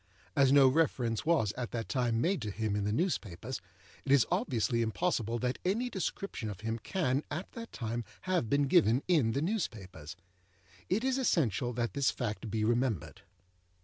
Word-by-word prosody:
As 135 Hz, -3 st, +5 dB
no 140 Hz, -1 st, +7 dB
reference 130 Hz, -4 st, +1 dB
was 155 Hz, -, +3 dB
at 125 Hz, -2 st, -4 dB
that 115 Hz, -2 st, -4 dB
time 120 Hz, -4 st, 0 dB
made 185 Hz, +6 st, +1 dB
to 105 Hz, -, -3 dB
him 110 Hz, 0 st, -2 dB
in 100 Hz, -1 st, -1 dB
the 105 Hz, -, 0 dB
newspapers, 115 Hz, -, -2 dB, 0.4 s
it 135 Hz, -, -2 dB
is 140 Hz, -4 st, +6 dB
obviously 125 Hz, -, +1 dB
impossible 115 Hz, -, 0 dB
that 125 Hz, +2 st, -2 dB
any 230 Hz, +7 st, 0 dB
description 190 Hz, -, -3 dB
of 105 Hz, 0 st, -7 dB
him 115 Hz, +1 st, -2 dB
can 140 Hz, -, 0 dB
at 165 Hz, +6 st, -5 dB
that 230 Hz, 0 st, -8 dB
time 115 Hz, 0 st, -3 dB, 0.2 s
have 180 Hz, -11 st, 0 dB
been 140 Hz, +3 st, +3 dB
given 135 Hz, -4 st, +4 dB
in 145 Hz, -11 st, +3 dB
the 140 Hz, -, 0 dB
newspapers. 100 Hz, -, -4 dB, 0.7 s
It 205 Hz, +6 st, +1 dB
is 265 Hz, 0 st, +1 dB
essential 125 Hz, -, +1 dB
that 120 Hz, 0 st, -2 dB
this 140 Hz, -5 st, +2 dB
fact 115 Hz, -1 st, -3 dB
be 110 Hz, 0 st, -1 dB
remembered. 120 Hz, -, 0 dB
125 Hz, 175 wpm, -31 LUFS, 110-165 Hz, 0.7 s, no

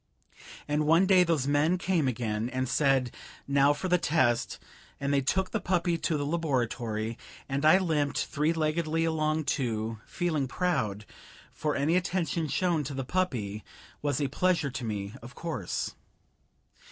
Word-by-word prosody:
And 150 Hz, +1 st, 0 dB
one 165 Hz, +4 st, +5 dB
day 185 Hz, -1 st, +6 dB
those 165 Hz, -6 st, +1 dB
men 145 Hz, +5 st, +2 dB
came 175 Hz, -5 st, +1 dB
again, 115 Hz, -2 st, -1 dB
and 130 Hz, 0 st, -2 dB
said, 135 Hz, -2 st, +2 dB, 0.3 s
now 140 Hz, 0 st, +4 dB
for 145 Hz, +6 st, -2 dB
the 180 Hz, 0 st, +3 dB
test, 130 Hz, -8 st, +1 dB, 0.4 s
and 140 Hz, 0 st, -1 dB
they 140 Hz, -, +3 dB
took 185 Hz, +8 st, 0 dB
the -, -, 0 dB
puppy 175 Hz, -1 st, +1 dB
to 160 Hz, -, 0 dB
the 145 Hz, -, -2 dB
laboratory, 120 Hz, -8 st, -1 dB, 0.3 s
and 140 Hz, +1 st, -2 dB
I 155 Hz, +4 st, +7 dB
limped 155 Hz, -6 st, 0 dB
three 150 Hz, +2 st, 0 dB
leggedly 160 Hz, 0 st, 0 dB
along, 155 Hz, -1 st, 0 dB
too, 115 Hz, -5 st, -2 dB
feeling 160 Hz, -6 st, -1 dB
proud, 110 Hz, -, -1 dB, 0.5 s
for 150 Hz, -1 st, -1 dB
any 150 Hz, +5 st, +2 dB
attention 175 Hz, -3 st, 0 dB
shown 170 Hz, -1 st, +1 dB
to 140 Hz, +1 st, -5 dB
the 135 Hz, -1 st, -3 dB
puppy 115 Hz, -, -2 dB, 0.4 s
was 145 Hz, -2 st, 0 dB
a 145 Hz, -, +1 dB
pleasure 165 Hz, 0 st, +1 dB
to 130 Hz, -1 st, -5 dB
me, 105 Hz, -2 st, -4 dB
of 120 Hz, +4 st, -11 dB
course. 170 Hz, -, -3 dB
145 Hz, 155 wpm, -29 LUFS, 130-165 Hz, 0.5 s, I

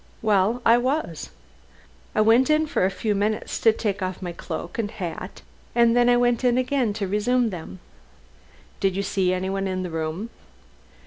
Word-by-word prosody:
Well, 215 Hz, +3 st, +2 dB
I 230 Hz, +1 st, +6 dB
was. 255 Hz, -, -2 dB, 0.9 s
I 215 Hz, -, +4 dB
went 230 Hz, +5 st, +4 dB
in 305 Hz, +1 st, +3 dB
for 290 Hz, -, 0 dB
a -, -, +2 dB
few 210 Hz, +2 st, -2 dB
minutes 210 Hz, +2 st, -1 dB
to 225 Hz, -, +5 dB
take 205 Hz, -2 st, -3 dB
off 185 Hz, 0 st, -3 dB
my 180 Hz, -2 st, -5 dB
cloak 170 Hz, +3 st, -6 dB
and 210 Hz, -3 st, -1 dB
hat, 175 Hz, -5 st, -7 dB, 0.3 s
and 235 Hz, -1 st, +4 dB
then 245 Hz, 0 st, +4 dB
I 245 Hz, -, +5 dB
went 245 Hz, 0 st, +1 dB
in 245 Hz, -1 st, +3 dB
again 255 Hz, -3 st, +1 dB
to 200 Hz, -2 st, -3 dB
resume 225 Hz, +4 st, +1 dB
them." 160 Hz, -, -8 dB, 1.0 s
"Did 195 Hz, -2 st, +1 dB
you 200 Hz, -, -1 dB
see 190 Hz, -2 st, 0 dB
anyone 190 Hz, +1 st, -2 dB
in 185 Hz, -1 st, -2 dB
the 180 Hz, -, -5 dB
room?" 160 Hz, +7 st, -4 dB
210 Hz, 180 wpm, -24 LUFS, 185-240 Hz, 1.0 s, I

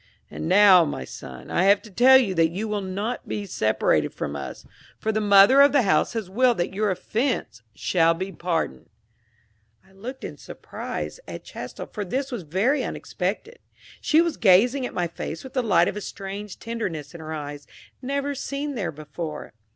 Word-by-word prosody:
And 160 Hz, -, -4 dB
now, 190 Hz, -2 st, +7 dB
my 105 Hz, -, -4 dB
son, 65 Hz, 0 st, -10 dB
I 180 Hz, -, +2 dB
have 200 Hz, +1 st, +6 dB
to 215 Hz, -, -13 dB
tell 255 Hz, +6 st, +7 dB
you 230 Hz, -8 st, +1 dB
that 165 Hz, -2 st, +3 dB
you 200 Hz, +6 st, -4 dB
will 210 Hz, -1 st, -2 dB
not 200 Hz, +6 st, -4 dB
be 205 Hz, -, -3 dB
separated 110 Hz, -, +1 dB
from 70 Hz, -, -4 dB
us, 70 Hz, -, -7 dB, 0.3 s
for 220 Hz, -, -1 dB
the 215 Hz, 0 st, -1 dB
mother 205 Hz, +6 st, +7 dB
of 285 Hz, +1 st, +6 dB
the 280 Hz, -4 st, +4 dB
house 155 Hz, -2 st, +2 dB
has 225 Hz, -4 st, -3 dB
willed 240 Hz, +5 st, +2 dB
that 175 Hz, +2 st, -2 dB
your 210 Hz, +1 st, 0 dB
offense 220 Hz, -, -2 dB
shall 165 Hz, -2 st, +2 dB
be 190 Hz, +3 st, -4 dB
pardoned." 165 Hz, -, -3 dB, 1.0 s
I 190 Hz, -, -23 dB
looked 230 Hz, +8 st, -8 dB
in -, -, -6 dB
surprise -, -, -7 dB
at -, -, -7 dB
Chastel, -, -, -8 dB
for 210 Hz, -, -5 dB
this 265 Hz, +8 st, -3 dB
was 240 Hz, -5 st, -4 dB
very 205 Hz, -, +1 dB
unexpected: 215 Hz, -, -4 dB, 0.4 s
she 315 Hz, +1 st, +4 dB
was 335 Hz, -2 st, -2 dB
gazing 240 Hz, +6 st, +4 dB
at -, -, -12 dB
my 180 Hz, -, 0 dB
face 165 Hz, -1 st, -6 dB
with 265 Hz, -, -10 dB
the 255 Hz, -, +1 dB
light 190 Hz, -7 st, +3 dB
of -, -, -2 dB
a 210 Hz, -, -4 dB
strange 200 Hz, 0 st, -7 dB
tenderness 185 Hz, -11 st, -5 dB
in 170 Hz, -, -9 dB
her 160 Hz, 0 st, -7 dB
eyes, 145 Hz, -2 st, -6 dB, 0.3 s
never 280 Hz, +2 st, -2 dB
seen 280 Hz, +1 st, -4 dB
there 210 Hz, -9 st, -3 dB
before. 155 Hz, 0 st, -7 dB
200 Hz, 190 wpm, -24 LUFS, 170-245 Hz, 1.0 s, now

